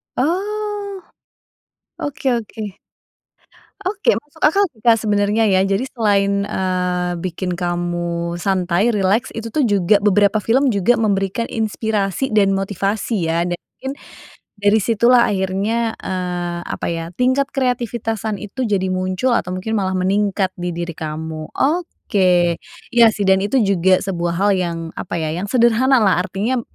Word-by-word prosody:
Oh. 400 +5 -2 1.0
Oke 280 -2 -2
oke. 215 -4 -5 1.1
Oke. 420 +5 +1
Masuk 295 +2 -12
akal 390 +7 +4
sih 220 - -24
Kak 230 0 +5
sebenarnya 205 +1 +2
ya. 190 -3 +3
Jadi 195 +5 0
selain, 200 -3 +1
eee, 180 -2 -1
bikin 180 +1 -3
kamu 175 -1 -2
santai, 190 +2 +1
rileks, 205 +1 +1
itu 225 0 -6
tuh 305 - +2
juga 200 0 +3
beberapa 205 +1 +3
film 250 +5 +2
juga 200 +5 +3
memberikan 200 +1 0
inspirasi 220 0 -2
dan 195 -2 +3
motivasi 195 -1 -1
ya 170 +1 +1
dan 175 - -2
mungkin 265 +1 -8 0.7
dari 205 +1 +4
situ 230 +2 +2
lah 245 -1 +6
akhirnya, 205 +4 0
eee, 180 -2 -3
apa - - -4
ya, 165 -1 -2
tingkat 260 +7 +1
kreativitasan 230 -4 -2
itu 215 +5 -4
jadi 200 -4 0
muncul 185 +6 0
atau 180 - -2
mungkin 190 +5 -2
malah 190 -2 0
meningkat 195 0 +1
di 175 0 -4
diri 170 0 -4
kamu. 155 0 -5
Oke. 185 - +1 0.3
Iya 235 -1 +7
sih 205 - -3
dan 190 0 +4
itu 205 +7 0
juga 190 -1 +3
sebuah 175 -3 -2
hal 200 +3 +2
yang, 175 -3 -1 0.2
apa - - -4
ya, 160 -2 -2
yang 180 +5 -4
sederhana 245 +3 +4
lah, 190 -3 +3
artinya 210 +7 -1
200 Hz, 145 wpm, -19 LUFS, 185-235 Hz, 1.1 s, Iya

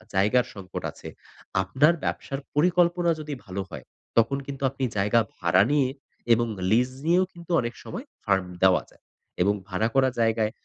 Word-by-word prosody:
জায়গার 105 +6 +3
সংকট 95 -3 -7
আছে, - - -12 0.5
আপনার 135 - +3
ব্যবসার 135 - -3 0.2
পরিকল্পনা 175 +2 +3
যদি 150 -1 -5
ভালো 95 +1 -4
হয়, - - -9 0.3
তখন 115 +4 +4
কিন্তু 140 -1 -6
আপনি 135 0 -6
জায়গা 105 +4 +3 0.2
ভাড়া 90 +2 +3
নিয়ে 140 -3 +3 0.4
এবং 120 +1 +2 0.3
লিজ 125 +3 +4 0.2
নিয়েও 175 +3 +4
কিন্তু 170 0 -10
অনেক 120 0 -4
সময় 245 - -7 0.2
ফার্ম 95 -2 +2 0.2
দেওয়া 95 -1 +5
যায়। - - -25 0.4
এবং 100 +3 +4
ভাড়া 100 +3 0
করা 135 -1 +4
জায়গায় 115 -1 +2
120 Hz, 160 wpm, -26 LUFS, 100-150 Hz, 0.5 s, দেওয়া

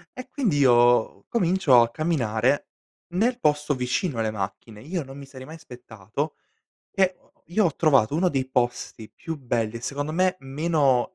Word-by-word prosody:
e 255 0 -8
quindi 230 - 0
io 120 -3 +4
comincio 180 - +4
a 115 0 +1
camminare, 130 -4 0 0.5
nel 240 +6 +1
posto 150 -4 +1
vicino 125 +2 -2
alle 110 -1 0
macchine. 105 +1 -6
Io 170 +3 -4
non 135 +1 -11
mi 140 - -9
sarei 130 -1 -11
mai 160 +3 -10
aspettato 125 - -7 0.6
che 190 -2 +2 0.3
io 210 +5 +2
ho 165 -6 +1
trovato, 135 -7 +3
uno 180 +4 +2
dei 135 -5 -2
posti 120 -3 -2
più 160 -1 -7
belli, 115 -4 -2
e 115 - -8
secondo 145 +4 -4
me 185 +2 +1
meno 140 +1 +1
140 Hz, 160 wpm, -24 LUFS, 120-165 Hz, 0.6 s, io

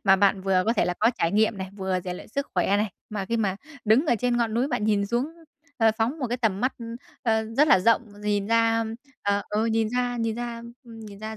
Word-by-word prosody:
Mà 195 -1 +6
bạn 195 0 +3
vừa 190 -1 +2
có 230 - +3
thể 220 - +2
là 180 - -1
có 225 +3 +5
trải 165 +2 +1
nghiệm 215 -1 +2
này, 190 0 -5
vừa 190 -2 -1
rèn 180 0 -5
luyện - - -11
sức 280 +5 -3
khỏe 190 +2 +2
này. 210 0 0 0.2
Mà 200 -2 -3
khi 230 +4 -1
mà 195 -4 0 0.3
đứng 230 +9 +4
ở 240 - +4
trên 245 -1 +1
ngọn 230 -2 0
núi 255 +4 +1
bạn 210 - -1
nhìn 205 -2 +2
xuống, 240 +4 0 0.5
ờ, 225 -2 +5
phóng 245 +8 0
một 260 - -1
cái 245 +1 -2
tầm 220 -4 0
mắt, 255 +2 +1 0.5
ơ, 220 -2 +1
rất 300 +2 +5
là 190 - +7
rộng, 230 +5 +3 0.2
nhìn 205 -1 0
ra, 230 0 +3 0.4
ờ, 200 0 +1
ừ, 215 +2 0
nhìn 225 -1 +1
ra 245 +1 -1
nhìn 230 -2 -1
ra, 235 -1 -5 0.2
ừm, 230 -1 -11
nhìn 205 -2 -10
ra 220 0 -6
220 Hz, 255 wpm, -25 LUFS, 200-235 Hz, 0.5 s, là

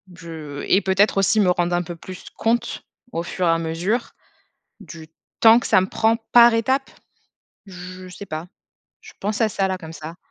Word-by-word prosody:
je 160 -3 -8
et 195 - +4
peut-être 195 +2 +2
aussi 195 +3 +3
me 190 -3 +4
rendre 175 0 0
un 175 - 0
peu 175 0 -7
plus 180 +2 -10
compte, 230 +1 -1 0.3
au 165 - -3
fur 180 +1 -3
et - - +3
à 165 - +3
mesure, 170 +8 -2 0.7
du 160 -2 -11 0.3
temps 225 0 +8
que - - -5
ça - - +4
me 185 - -1
prend 225 +2 +2 0.2
par 240 -1 +8
étape, 260 +4 0 0.8
je 185 0 -10
sais 180 +3 -10
pas. 155 -1 -6 0.5
Je - - -14
pense 205 +1 -2
à 225 - +4
ça, 195 -1 0
là, 190 - -2
comme 165 -2 -10
ça. 160 +1 -8
185 Hz, 190 wpm, -22 LUFS, 165-215 Hz, 0.8 s, temps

